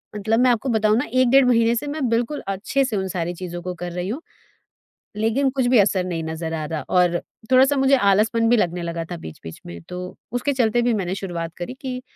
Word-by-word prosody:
मतलब 220 +2 +1
मैं 250 0 +5
आपको 240 +3 -1
बताऊँ 215 -2 +3
ना, 265 - 0
1 255 -1 +4
डेढ़ 270 +1 +6
महीने 230 -1 +3
से 290 +5 -3
मैं 290 -2 -2
बिल्कुल 235 +5 -1
अच्छे 200 +8 0
से 230 -5 -2
उन 190 -1 -2
सारी 175 -1 -3
चीज़ों 175 0 -6
को 180 +1 -4
कर 175 0 -6
रही 180 +1 -4
हूँ। 275 +9 -4 1.0
लेकिन 225 +6 +1
कुछ 260 -1 -1
भी 250 - +6
असर 190 -2 +3
नहीं 170 -3 -3
नज़र 160 0 -4
आ 155 - -3
रहा 155 -1 -3
और 175 -1 +3 0.3
थोड़ा-सा 265 +2 +5
मुझे 270 +1 +4
आलसपन 225 +1 +3
भी 240 - +5
लगने 175 -3 0
लगा 170 -1 -4
था 175 - -4
बीच-बीच 80 - -10
में 85 0 -8
तो 180 - -5 0.3
उसके 260 +4 0
चलते 240 -2 +2
भी 240 -1 +2
मैंने 190 -3 -2
शुरुआत 170 -4 -5
करी 175 +7 -5
कि 255 -2 -4
215 Hz, 225 wpm, -22 LUFS, 175-250 Hz, 1.0 s, डेढ़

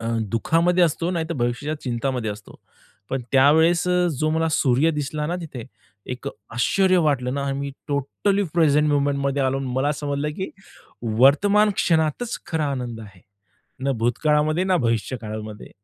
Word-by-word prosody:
अ, 115 - -5 0.3
दुःखामध्ये 170 +9 +3
असतो 165 +2 -1
नाहीतर 165 -2 -2
भविष्याच्या 135 +5 -2
चिंतामध्ये 125 -2 -2
असतो. 105 +1 -11 0.5
पण 135 -2 -2
त्यावेळेस 160 +6 +4
अ, 180 0 +2
जो 155 0 +1
मला 160 +1 +1
सूर्य 140 +2 +3
दिसला 150 0 -3
ना 175 - -2
तिथे, 130 -8 -7 0.5
एक 125 - -5 0.3
आश्चर्य 185 +9 +3
वाटलं 130 -3 0
ना, 140 - -2
मी 140 0 -4 0.2
टोटली 150 +8 0
प्रेझेंट 150 -2 +3
मोमेंटमध्ये 140 -1 0
आलो 135 +1 0
आणि 135 - -4
मला 140 +3 +1
समजलं, 145 0 -3
की 190 - -4 0.7
वर्तमान 205 +10 +5
क्षणातच 160 +8 0
खरा 160 -2 -1
आनंद 120 -3 -5
आहे. 100 -4 -13 0.6
ना 140 - +1
भूतकाळामध्ये, 150 +7 +2
ना 185 -1 +2
भविष्य 115 0 -1
काळामध्ये. 110 -1 -7
145 Hz, 150 wpm, -23 LUFS, 125-165 Hz, 0.7 s, वर्तमान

